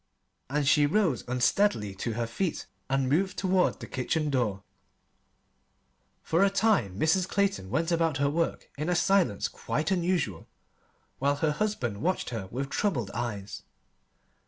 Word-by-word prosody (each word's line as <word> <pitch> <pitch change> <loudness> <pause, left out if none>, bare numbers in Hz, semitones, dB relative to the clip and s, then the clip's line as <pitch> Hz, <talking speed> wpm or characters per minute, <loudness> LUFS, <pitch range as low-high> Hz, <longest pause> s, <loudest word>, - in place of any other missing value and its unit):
And 145 0 0
she 145 +1 +5
rose 165 - +1
unsteadily 125 - +1
to 110 +4 -3
her 115 +1 -1
feet 160 +9 -2 0.2
and 135 -1 +1
moved 185 +8 +1
toward 185 -1 +2
the - - -7
kitchen 150 +4 -1
door. 110 -8 0 1.6
For 165 +4 +2
a 200 - +5
time 195 - +1
Mrs. 180 +3 +2
Clayton 195 - 0
went 165 - 0
about 165 -3 +1
her 140 0 +2
work 165 +2 -2
in 155 +3 -1
a 180 - +2
silence 175 - +2
quite 155 +5 -3
unusual, 175 - 0 0.7
while 140 +1 +2
her 150 +1 +1
husband 150 - -2
watched 185 -5 -1
her 110 -5 -4
with 135 +7 -4
troubled 125 - -1
eyes. 105 -4 -4
150 Hz, 145 wpm, -28 LUFS, 120-185 Hz, 1.6 s, she